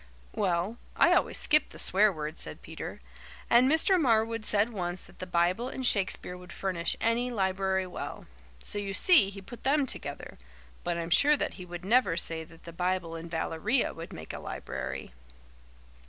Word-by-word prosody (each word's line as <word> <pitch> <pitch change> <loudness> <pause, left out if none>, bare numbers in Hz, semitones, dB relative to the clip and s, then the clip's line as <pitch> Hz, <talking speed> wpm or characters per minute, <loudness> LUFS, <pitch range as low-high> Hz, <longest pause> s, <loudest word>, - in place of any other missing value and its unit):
"Well, 190 +2 0 0.2
I - - +5
always - - +2
skip 305 0 +4
the - - -12
swear 205 +3 +5
words," 155 -1 -5
said - - -7
Peter. - - -7 0.5
"And 245 +2 +6
Mr. 350 +3 +4
Marwood 225 -3 +2
said 210 +3 +2
once 175 -2 -3
that - - -18
the 185 - -6
Bible 180 +7 +1
and 260 -1 -4
Shakespeare 190 -4 +1
would 180 -1 -12
furnish 180 -3 -1
any 235 +2 +1
library 190 -3 0
well. 180 - -7 0.4
So 205 - -1
you 200 -1 -3
see 320 - +5
he 195 -1 -10
put 235 +4 -11
them 280 +1 +3
together, 260 - -4 0.4
but 175 -1 -1
I'm 170 0 -4
sure 295 - +5
that - - -2
he 180 -2 -10
would 175 +1 -7
never 210 -6 +3
say 165 -2 -2
that 165 +1 -17
the 170 - -10
Bible 180 -1 -1
and 165 +1 -7
Valeria 165 +9 0
would 165 +1 -9
make 80 - -8
a - - -6
library." 65 -1 -6
190 Hz, 180 wpm, -29 LUFS, 170-230 Hz, 0.5 s, And